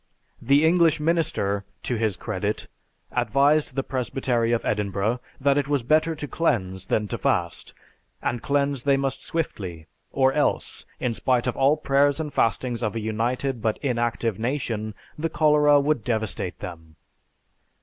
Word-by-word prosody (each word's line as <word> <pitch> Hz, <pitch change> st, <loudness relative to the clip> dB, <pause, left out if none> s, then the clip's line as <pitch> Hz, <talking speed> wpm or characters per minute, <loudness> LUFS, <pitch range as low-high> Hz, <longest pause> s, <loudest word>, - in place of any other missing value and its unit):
The 140 Hz, +5 st, +4 dB
English 165 Hz, -1 st, +4 dB
minister, 150 Hz, -11 st, 0 dB, 0.2 s
to 125 Hz, -, -1 dB
his 110 Hz, -4 st, 0 dB
credit, 105 Hz, -1 st, -3 dB, 0.5 s
advised 140 Hz, +6 st, +2 dB
the 135 Hz, -, 0 dB
Presbytery 125 Hz, -2 st, -1 dB
of 120 Hz, -, 0 dB
Edinburgh 105 Hz, +3 st, 0 dB, 0.2 s
that 140 Hz, +1 st, +3 dB
it 140 Hz, -, -2 dB
was 145 Hz, -4 st, 0 dB
better 155 Hz, +5 st, +2 dB
to 150 Hz, -1 st, -6 dB
cleanse 95 Hz, -, -1 dB
than 105 Hz, -1 st, 0 dB
to -, -, -3 dB
fast, 85 Hz, -1 st, -1 dB, 0.4 s
and 120 Hz, -1 st, -2 dB
cleanse 140 Hz, -1 st, 0 dB
they 140 Hz, +1 st, +3 dB
must 135 Hz, -1 st, -2 dB
swiftly 95 Hz, -, -4 dB, 0.3 s
or 135 Hz, -1 st, +3 dB
else, 150 Hz, -, -1 dB
in 125 Hz, -, 0 dB
spite 125 Hz, +1 st, +1 dB
of 125 Hz, -, -1 dB
all 140 Hz, +3 st, +3 dB
prayers 145 Hz, 0 st, +2 dB
and 150 Hz, -2 st, -4 dB
fastings 115 Hz, +2 st, 0 dB
of 110 Hz, -2 st, -1 dB
a -, -, -1 dB
united 115 Hz, +4 st, -1 dB
but 110 Hz, -1 st, 0 dB
inactive 120 Hz, -4 st, -1 dB
nation, 115 Hz, -4 st, -2 dB, 0.2 s
the 165 Hz, +1 st, -1 dB
cholera 150 Hz, -1 st, +4 dB
would 140 Hz, -4 st, +1 dB
devastate 110 Hz, -6 st, -2 dB
them. 80 Hz, -3 st, -9 dB
125 Hz, 150 wpm, -24 LUFS, 110-145 Hz, 0.5 s, The